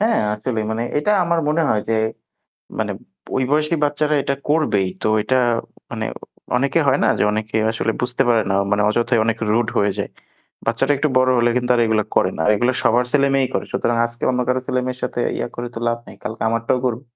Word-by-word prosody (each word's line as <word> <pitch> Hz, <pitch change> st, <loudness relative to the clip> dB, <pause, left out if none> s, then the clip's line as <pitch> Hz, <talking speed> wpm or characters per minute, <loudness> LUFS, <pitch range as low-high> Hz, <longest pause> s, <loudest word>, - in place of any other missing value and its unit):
হ্যাঁ 225 Hz, +2 st, +2 dB, 0.2 s
আসলেই 110 Hz, 0 st, -3 dB
মানে 115 Hz, +1 st, -1 dB, 0.2 s
এটা 180 Hz, +8 st, 0 dB
আমার 170 Hz, 0 st, +1 dB
মনে 160 Hz, +2 st, +2 dB
হয় 105 Hz, -, +2 dB
যে -, -, +1 dB, 0.9 s
মানে -, -, -1 dB, 0.4 s
ওই 130 Hz, -, +1 dB
বয়সেই 155 Hz, +2 st, +1 dB
বাচ্চারা 150 Hz, +1 st, 0 dB
এটা 140 Hz, -, -1 dB
করবেই। 145 Hz, -11 st, +2 dB, 0.2 s
তো -, -, 0 dB, 0.2 s
এটা 130 Hz, -, +1 dB, 0.6 s
মানে -, -, -3 dB, 0.5 s
অনেকে 140 Hz, +5 st, +1 dB
হয় 135 Hz, -, +4 dB
না -, -, +3 dB
যে -, -, +2 dB
অনেকে 110 Hz, +1 st, -2 dB
আসলে 115 Hz, 0 st, -1 dB
বুঝতে 125 Hz, +2 st, 0 dB
পারে 115 Hz, -2 st, +4 dB
না। 95 Hz, -, +2 dB, 0.2 s
মানে 105 Hz, 0 st, +2 dB
অযথায় 120 Hz, +1 st, +2 dB
অনেক 115 Hz, 0 st, 0 dB
রুড 115 Hz, +1 st, +2 dB
হয়ে 100 Hz, 0 st, +2 dB
যায়। -, -, -2 dB, 0.6 s
বাচ্চাটা 115 Hz, +5 st, +2 dB
একটু 155 Hz, -, +1 dB
বড় 130 Hz, 0 st, +4 dB
হলে 120 Hz, 0 st, +3 dB
কিন্তু 125 Hz, 0 st, -1 dB, 0.2 s
এগুলা 110 Hz, -2 st, +1 dB
করে 95 Hz, -, +3 dB
না। 80 Hz, -, 0 dB
এগুলা 120 Hz, +4 st, +1 dB
সবার 120 Hz, +2 st, +3 dB
ছেলেমেয়েই 135 Hz, -2 st, +3 dB
করে। -, -, -1 dB
সুতরাং 120 Hz, -, 0 dB
আজকে 120 Hz, 0 st, -15 dB
অন্য 125 Hz, 0 st, 0 dB
কারো 125 Hz, 0 st, +1 dB
ছেলেমেয়ের 125 Hz, 0 st, -2 dB
সাথে 120 Hz, -, -3 dB, 0.2 s
ইয়া -, -, -3 dB
করে 120 Hz, -, -4 dB
তো -, -, -4 dB
লাভ 115 Hz, 0 st, -1 dB
নেই। -, -, -12 dB
কালকে 110 Hz, -, -5 dB
আমারটাও 115 Hz, +2 st, 0 dB
করবে। 120 Hz, 0 st, -2 dB
120 Hz, 205 wpm, -20 LUFS, 115-135 Hz, 0.9 s, হয়